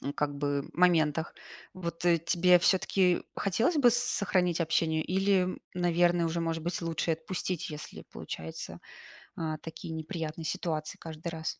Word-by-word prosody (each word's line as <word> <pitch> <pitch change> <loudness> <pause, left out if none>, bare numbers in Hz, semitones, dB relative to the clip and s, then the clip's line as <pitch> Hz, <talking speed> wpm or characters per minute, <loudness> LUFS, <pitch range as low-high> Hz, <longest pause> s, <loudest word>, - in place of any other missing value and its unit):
ну 140 - -3
как 145 -1 -2
бы 145 0 -1
моментах. 165 -2 +2 0.4
Вот 170 -2 -5
тебе 175 +1 +4
всё-таки 185 0 +3
хотелось 225 - +1
бы 245 -5 +6
сохранить 195 -7 +1
общение, 160 0 +1
или, 190 +1 +1 0.2
наверное, 175 -1 +3
уже, 170 +1 -1
может 165 -1 -2
быть, 175 +2 -2
лучше 165 0 0
отпустить, 175 +1 -3
если 150 0 -8
получаются, 80 0 -7 0.6
а, 155 -1 -3
такие, 165 0 -7
неприятные 160 0 -5
ситуации 160 -4 -3
каждый 165 +1 -6
раз? 160 -1 -4
170 Hz, 135 wpm, -30 LUFS, 160-180 Hz, 0.6 s, бы